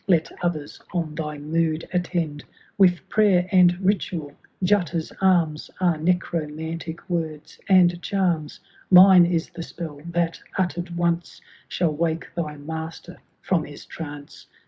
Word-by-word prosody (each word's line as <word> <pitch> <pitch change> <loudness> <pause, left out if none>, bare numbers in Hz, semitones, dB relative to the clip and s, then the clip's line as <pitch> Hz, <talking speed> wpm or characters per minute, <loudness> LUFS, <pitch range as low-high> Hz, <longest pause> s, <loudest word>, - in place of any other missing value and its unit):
^ - - -39
Let 170 -4 +2
others 155 -4 -3
on 165 -3 -1
thy 150 -1 -4
mood 160 +2 -1
attend 170 -4 -1 0.3
With 180 -4 +3
prayer 195 -5 +3
and 180 -2 +6
rituaL^utta's 180 -1 -1
arms 170 -5 +2
Are 175 -4 +2
necromantic 165 -1 -2
words 160 -4 -4
and 175 -2 +5
charms; 175 -7 -1 0.3
Mine 185 -1 +8
is 170 -1 -1
the 170 -1 -7
spell, 160 -3 -7
that, 170 -1 -1 0.2
utter'd 175 -2 -2
once. 170 0 -1 0.3
Shall 170 -4 0
wake 165 +1 -2
Thy 155 -4 -4
Master 160 +3 -7 0.2
from 170 -5 +1
his 145 0 -11
trance. 145 -3 -9
170 Hz, 125 wpm, -24 LUFS, 155-180 Hz, 0.3 s, Mine